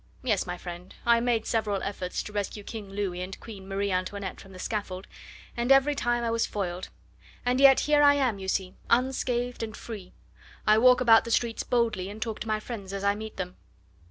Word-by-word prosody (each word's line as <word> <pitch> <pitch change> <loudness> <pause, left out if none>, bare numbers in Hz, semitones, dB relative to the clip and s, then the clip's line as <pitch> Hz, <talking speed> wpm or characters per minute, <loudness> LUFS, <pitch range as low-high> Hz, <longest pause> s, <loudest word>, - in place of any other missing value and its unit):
Yes, 210 -7 +1
my 180 0 -4
friend, 175 +1 -9
I 235 0 +5
made 230 -2 +1
several 210 -4 0
efforts 185 -2 -3
to 210 - -9
rescue 205 0 -3
King 210 -2 -7
Louis 195 -3 -3
and 185 +1 -6
Queen 195 -4 -10
Marie 200 +1 -1
Antoinette 185 +1 -3
from 195 - -14
the 185 - -11
scaffold, 195 -1 -4 0.5
and 240 +2 0
every 270 +2 +6
time 240 -3 0
I 230 - 0
was 230 0 +1
foiled, 185 -3 -4 0.6
and 250 +2 +2
yet 275 -1 +8
here 295 0 +4
I 285 0 +7
am, 255 -8 +1
you 190 - -6
see, 190 -1 -1 0.2
unscathed 245 -1 +1
and 220 -2 -5
free. 200 -6 -8 0.5
I 215 +1 +5
walk 250 +1 +6
about 225 -2 +7
the - - -6
streets 230 0 +1
boldly, 225 -6 0
and 210 +2 -8
talk 220 -1 -3
to - - -5
my 215 0 0
friends 210 -4 -7
as 195 0 -4
I 200 0 +3
meet 215 +1 -7
them." 180 -1 -5
215 Hz, 210 wpm, -28 LUFS, 195-240 Hz, 0.6 s, yet